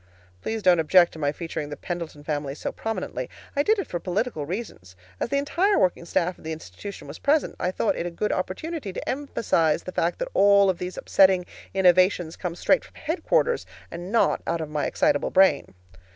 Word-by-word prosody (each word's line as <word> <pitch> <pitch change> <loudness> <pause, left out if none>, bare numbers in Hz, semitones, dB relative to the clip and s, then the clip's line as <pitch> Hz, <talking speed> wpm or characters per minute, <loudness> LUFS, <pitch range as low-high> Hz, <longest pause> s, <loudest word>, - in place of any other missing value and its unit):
Please 220 - -3
don't 180 -2 +5
object 175 +2 +5
to 160 - -10
my 145 -1 +1
featuring 155 -2 -5
the 145 - -6
Pendleton 170 -4 -6
family 145 -2 -3
so - - -4
prominently. 185 - -4 0.3
I 285 - +3
did 435 +9 +3
it 395 - -2
for 175 - -4
political 185 - -2
reasons. 165 - -6 0.2
As - - -2
the 280 - +1
entire 350 +8 +2
working 180 -2 +1
staff 180 0 -1
of - - -17
the 160 - -4
institution 160 - -8
was 140 - -9
present, 295 +2 +1
I 180 - 0
thought 195 +3 0
it 170 - -3
a - - -2
good 190 +5 -2
opportunity 220 - -3
to - - -6
emphasize 225 - 0
the 185 - -6
fact 170 -1 0
that - - -3
all 200 -1 +5
of 175 - -9
these 180 0 -5
upsetting, 190 -2 +4 0.3
innovations 180 -2 +3
come 175 -2 -4
straight 275 +9 +2
from - - -18
headquarters, 365 +9 0 0.2
and 175 +3 -7
not 230 - +2
out 170 - 0
of 155 -2 -5
my 150 -1 -1
excitable 145 - +1
brain. 185 - +3
180 Hz, 200 wpm, -25 LUFS, 160-220 Hz, 0.3 s, don't